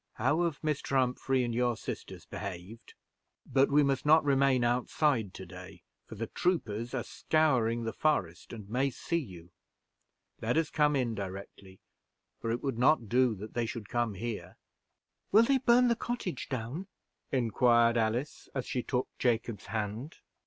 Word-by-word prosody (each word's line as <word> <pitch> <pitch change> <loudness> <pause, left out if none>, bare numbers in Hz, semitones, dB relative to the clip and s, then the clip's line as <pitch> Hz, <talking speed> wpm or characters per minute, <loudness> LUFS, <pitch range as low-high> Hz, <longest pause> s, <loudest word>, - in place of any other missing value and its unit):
How 145 +9 +1
have 160 -3 -2
Mr. 150 -3 -1
Humphrey 130 0 +1
and 120 -1 -2
your 120 -1 +1
sisters - - -7
behaved? 100 +2 -8 0.5
But 135 0 +3
we 145 +1 +5
must 135 -2 +1
not 155 +2 +6
remain 135 -2 +3
outside 120 - +1
to 95 - -8
day, 90 +1 -11 0.2
for - - -9
the 115 +2 -3
troopers 120 - -1
are 120 - -1
scouring 125 -7 +1
the 115 - -3
forest, 90 - -1
and 110 -4 -8
may 130 +6 +1
see 170 +7 -2
you. 90 - -10 0.9
Let 115 +6 0
us 165 -2 +1
come 150 -1 +3
in 125 -4 0
directly, 95 -1 -8 0.6
for 115 - -3
it 115 +1 -2
would 135 -5 -2
not 125 -4 +3
do 125 -2 +3
that 105 +2 -9
they 120 -1 -1
should 110 -2 -6
come 120 -4 0
here." 115 +2 -5 0.7
"Will 215 +3 +7
they 270 +3 +3
burn 245 0 +5
the 235 - +3
cottage 235 -6 -4
down?" 130 +8 -4 0.4
inquired 120 -1 +3
Alice, 115 +5 -1
as 130 - -2
she 125 - -2
took 125 +1 -1
Jacob's 115 -4 0
hand. 110 +6 -4
120 Hz, 160 wpm, -31 LUFS, 110-145 Hz, 0.9 s, Will